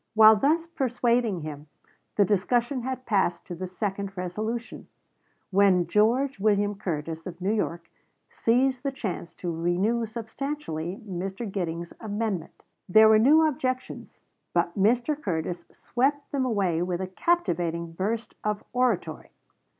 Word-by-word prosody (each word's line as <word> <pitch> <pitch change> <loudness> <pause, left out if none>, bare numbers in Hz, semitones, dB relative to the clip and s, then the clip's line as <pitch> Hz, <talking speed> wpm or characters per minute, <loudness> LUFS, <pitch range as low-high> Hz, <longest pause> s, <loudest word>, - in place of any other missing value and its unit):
While 220 0 +9
thus 310 +9 +2
persuading 245 - 0
him, 150 -1 -7 0.5
the 205 - +5
discussion 240 +7 +1
had 255 +1 -4
passed 195 -5 +1
to - - -7
the 185 +2 -5
second 195 +1 -4
resolution, 215 +6 -4 0.6
when 190 -2 +4
George 230 +8 +2
William 205 0 +2
Curtis, 165 -4 -4
of 175 -1 -8
New 190 +3 0
York, 170 -6 -2 0.4
seized 255 +2 +2
the 275 - -1
chance 180 -9 -5
to 175 - -4
renew 190 +8 +1
substantially 220 - -5
Mr. 190 +4 -4
Giddings's 170 -4 -4
amendment. 210 -5 -3 0.3
There 220 +3 +7
were 215 0 +6
new 305 +7 +6
objections, 255 -3 -4 0.3
but 170 0 +1
Mr. 240 +8 +2
Curtis 175 - -3
swept 280 +4 -1
them 270 -2 0
away 195 -8 +1
with 175 0 -1
a 190 - -2
captivating 175 - 0
burst 215 +7 -3
of 210 -1 -1
oratory. 225 -11 0
205 Hz, 135 wpm, -26 LUFS, 175-245 Hz, 0.6 s, While